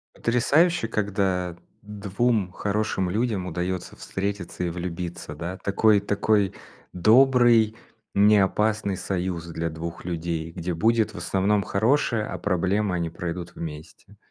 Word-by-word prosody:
Потрясающе, 140 +5 +2
когда 95 -5 -1 0.3
2 105 0 -1
хорошим 100 -2 -1
людям 105 -1 -1
удается 90 +1 -3
встретиться 95 -2 -4
и - - -1
влюбиться, 85 -2 -5
да, 85 +4 -5
такой 105 +1 +4
такой 100 -1 +1 0.4
добрый, 115 +2 +5 0.4
неопасный 105 0 +3
союз 90 -3 -3
для 85 0 -3
2 80 +2 -6
людей, 85 -2 -3
где 85 +1 -4
будет 110 +6 +2
в - - -9
основном 100 +3 +1
хорошее, 115 +2 +1
а - - -5
проблемы, 95 +1 0
они 85 -1 -1
пройдут 85 +1 -6
вместе. 75 -2 -9
95 Hz, 115 wpm, -25 LUFS, 90-110 Hz, 0.4 s, добрый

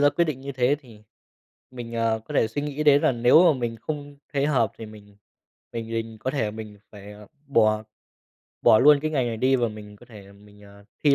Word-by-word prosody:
ra 145 - +5
quyết 170 - +1
định 150 -5 -4
như 140 +1 -7
thế 130 +2 +1
thì 115 -7 -17 0.7
mình, 120 -2 -9
ờ, 115 -1 0
có - - -8
thể 110 - +2
suy 130 +6 -4
nghĩ 150 +1 -3
đến 145 -1 +5
là - - +3
nếu 120 +8 +5
mà 135 - -5
mình 115 -1 -3
không 145 +3 -7
thấy 140 0 0
hợp 125 -8 +1
thì 115 - -8
mình 105 -1 -15 0.6
mình 115 -1 -6
mình 115 0 -4
có 130 - -2
thể 115 -7 -2
mình 110 -1 -9
phải 105 0 -12 0.3
bỏ 110 -5 +2 0.8
bỏ 115 -2 +6
luôn 145 +3 +6
cái 155 - -1
ngành 135 -5 0
này 115 -1 -3
đi 130 +4 +2
và 120 -2 0
mình 105 -1 -11
có 120 - -18
thể 100 -4 -14
mình, 105 +1 -19
ờ, 100 0 -17 0.2
thi 145 -2 +5
115 Hz, 225 wpm, -24 LUFS, 110-140 Hz, 0.8 s, bỏ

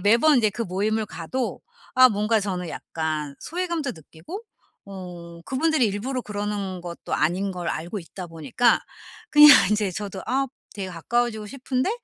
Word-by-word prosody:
매번 235 +9 +5
이제 215 -3 +3
그 230 +4 -3
모임을 210 +3 -1
가도 240 +11 -4 0.3
아 255 0 +8
뭔가 215 +1 +1
저는 180 -4 -3
약간 155 -3 -4
소외감도 340 -5 -2
느끼고 160 - -10 0.4
어 175 -3 -9
그분들이 300 -2 +2
일부러 235 +6 -2
그러는 205 -3 -3
것도 175 -1 -5
아닌 185 +4 0
걸 175 -2 -4
알고 175 +6 -3
있다 180 +2 -8
보니까 165 - +2 0.5
그냥 300 0 +10 0.2
인제 210 -2 +1
저도 195 0 -5
아 270 +1 +1 0.3
되게 195 -2 -4
가까워지고 220 +5 -1
싶은데 255 - -1
205 Hz, 320 characters per minute, -24 LUFS, 180-250 Hz, 0.5 s, 그냥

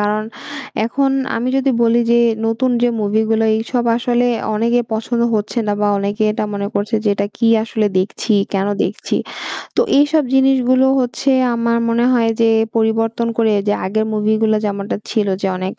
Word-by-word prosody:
কারণ 210 +1 0 0.6
এখন 270 +3 0 0.3
আমি 240 +2 -2
যদি 270 0 +1
বলি 235 +1 +3
যে 235 - +4 0.3
নতুন 230 +3 0
যে 245 - +4
মুভি 210 +1 +1
গুলো, 225 0 +2
এইসব 240 +2 -2
আসলে 245 0 +1 0.3
অনেকে 235 +3 +1
পছন্দ 235 +2 -1
হচ্ছে 210 +3 -2
না 205 - 0
বা 210 - +2
অনেকে 205 +2 -2
এটা 215 - -2
মনে 200 0 -3
করছে 205 +3 -2
যে - - +2
এটা 200 0 -1
কি 235 - 0 0.2
আসলে 220 -1 -1
দেখছি 205 +4 -2 0.2
কেন 195 0 0 0.2
দেখছি? - - -3 0.6
তো - - +4 0.2
এইসব 300 +2 +3
জিনিসগুলো 265 -1 +3
হচ্ছে 255 +2 -1 0.2
আমার 235 0 0
মনে 235 +1 +1
হয় 230 -2 +2
যে 230 - +4 0.3
পরিবর্তন 225 +1 0
করে 225 -2 +3 0.2
যে - - +3
আগের 220 +3 0
মুভি 215 0 0
গুলা 215 -1 +2
যেমনটা 200 0 -3
ছিল 215 -2 0 0.2
যে - - +1
অনেক 185 +1 -4
225 Hz, 175 wpm, -17 LUFS, 210-240 Hz, 0.6 s, যে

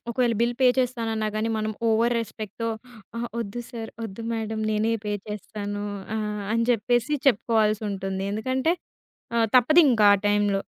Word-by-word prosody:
ఒకవేళ 240 -1 +1
bill 235 +1 +2
pay 260 - +6
చేస్తానన్నా 225 -4 0
గానీ, 220 +1 0
మనం 215 0 -1 0.2
ఓవర్ 230 +2 +3
రెస్పెక్ట్‌తో 220 0 -5 0.5
అహా! 235 +1 -2
వద్దు 230 +2 -4
సార్, 225 -3 -7
వద్దు 225 0 -6
మేడం, 220 -1 -3
నేనే 215 +1 +1
పే 210 - -2 0.2
చేస్తాను 205 0 -5 0.3
ఆహ్, 210 -1 -2
అని 230 0 +2
చెప్పేసి 240 +4 +1
చెప్పుకోవాల్సొటుంది. 210 -4 +1
ఎందుకంటే 260 +8 0 0.6
ఆహ్, 225 -1 +3
తప్పదింకా 250 -5 +6
ఆ 195 - -8
టైంలో. 205 -1 +2
220 Hz, 140 wpm, -25 LUFS, 210-235 Hz, 0.6 s, పే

